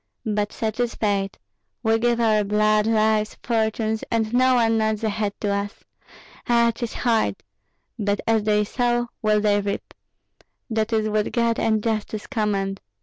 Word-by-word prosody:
But 210 Hz, -1 st, -1 dB
such 220 Hz, 0 st, -3 dB
is 240 Hz, -1 st, 0 dB
fate! 200 Hz, -2 st, -1 dB, 0.5 s
We 225 Hz, 0 st, +3 dB
give 240 Hz, 0 st, +1 dB
our 215 Hz, -2 st, +3 dB
blood, 210 Hz, +1 st, +2 dB
lives, 215 Hz, -1 st, +2 dB
fortunes, 220 Hz, -1 st, 0 dB
and 225 Hz, -1 st, 0 dB
no 255 Hz, +1 st, +4 dB
one 225 Hz, -2 st, +3 dB
nods 220 Hz, 0 st, 0 dB
a 220 Hz, -, +1 dB
head 205 Hz, -1 st, -3 dB
to 205 Hz, -, 0 dB
us. 200 Hz, +1 st, -4 dB, 0.7 s
Ah! 235 Hz, -1 st, +4 dB
'tis 235 Hz, 0 st, -5 dB
hard; 230 Hz, -3 st, +1 dB, 0.6 s
but 205 Hz, -1 st, 0 dB
as 225 Hz, -1 st, +2 dB
they 210 Hz, 0 st, +2 dB
sow 240 Hz, +2 st, 0 dB
will 215 Hz, -1 st, +2 dB
they 205 Hz, -1 st, +2 dB
reap. 200 Hz, 0 st, -4 dB, 0.8 s
That 220 Hz, 0 st, 0 dB
is 220 Hz, -1 st, +1 dB
what 210 Hz, 0 st, 0 dB
God 235 Hz, -1 st, +1 dB
and 220 Hz, -1 st, +1 dB
justice 215 Hz, -1 st, -2 dB
command. 200 Hz, -5 st, -1 dB
220 Hz, 160 wpm, -23 LUFS, 210-230 Hz, 0.8 s, no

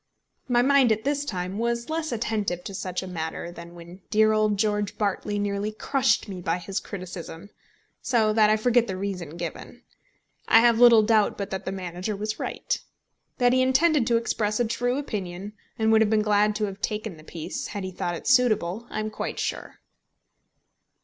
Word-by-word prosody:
My 240 Hz, -1 st, +3 dB
mind 270 Hz, -3 st, +4 dB
at 220 Hz, 0 st, 0 dB
this 285 Hz, +1 st, 0 dB
time 185 Hz, -4 st, -4 dB
was 235 Hz, +1 st, -1 dB
less 320 Hz, -1 st, -2 dB
attentive 210 Hz, -6 st, -2 dB
to 195 Hz, -, -7 dB
such 185 Hz, -1 st, -4 dB
a -, -, -7 dB
matter 165 Hz, -1 st, -5 dB
than 170 Hz, 0 st, -11 dB
when 175 Hz, +2 st, -12 dB
dear 215 Hz, 0 st, +4 dB
old 215 Hz, -1 st, +2 dB
George 210 Hz, -1 st, 0 dB
Bartley 205 Hz, 0 st, -1 dB
nearly 205 Hz, +1 st, -1 dB
crushed 260 Hz, +4 st, +1 dB
me 190 Hz, -3 st, -6 dB
by 165 Hz, 0 st, 0 dB
his 190 Hz, +2 st, -4 dB
criticism, 185 Hz, 0 st, -8 dB, 0.5 s
so 220 Hz, -3 st, +2 dB
that 215 Hz, -1 st, +5 dB
I 215 Hz, -, +4 dB
forget 240 Hz, +1 st, +3 dB
the 190 Hz, -, -4 dB
reason 180 Hz, -5 st, -5 dB
given. 170 Hz, -1 st, -7 dB, 0.6 s
I 225 Hz, -, +7 dB
have 235 Hz, -1 st, +4 dB
little 235 Hz, -3 st, +8 dB
doubt 215 Hz, -1 st, +2 dB
but 200 Hz, -1 st, -5 dB
that 190 Hz, -, -4 dB
the -, -, -2 dB
manager 185 Hz, +2 st, -4 dB
was 215 Hz, +2 st, -4 dB
right. -, -, -3 dB, 0.6 s
That 245 Hz, -1 st, +3 dB
he 255 Hz, -, +4 dB
intended 265 Hz, 0 st, +3 dB
to 235 Hz, -, +3 dB
express 215 Hz, -2 st, -1 dB
a 240 Hz, -, +2 dB
true 245 Hz, +3 st, -1 dB
opinion, 200 Hz, -7 st, -5 dB, 0.2 s
and 220 Hz, -1 st, +2 dB
would 220 Hz, 0 st, +5 dB
have 220 Hz, -, +3 dB
been 215 Hz, -1 st, +2 dB
glad 210 Hz, 0 st, +2 dB
to 215 Hz, -, -2 dB
have 200 Hz, 0 st, -7 dB
taken 215 Hz, -3 st, -3 dB
the 155 Hz, -, -14 dB
piece 165 Hz, +1 st, -6 dB
had 205 Hz, -, -5 dB
he 185 Hz, -, -4 dB
thought 175 Hz, -1 st, -3 dB
it -, -, -9 dB
suitable, 235 Hz, -5 st, +2 dB
I -, -, -3 dB
am 215 Hz, 0 st, -4 dB
quite -, -, -4 dB
sure. -, -, -4 dB
210 Hz, 195 wpm, -25 LUFS, 185-230 Hz, 0.6 s, little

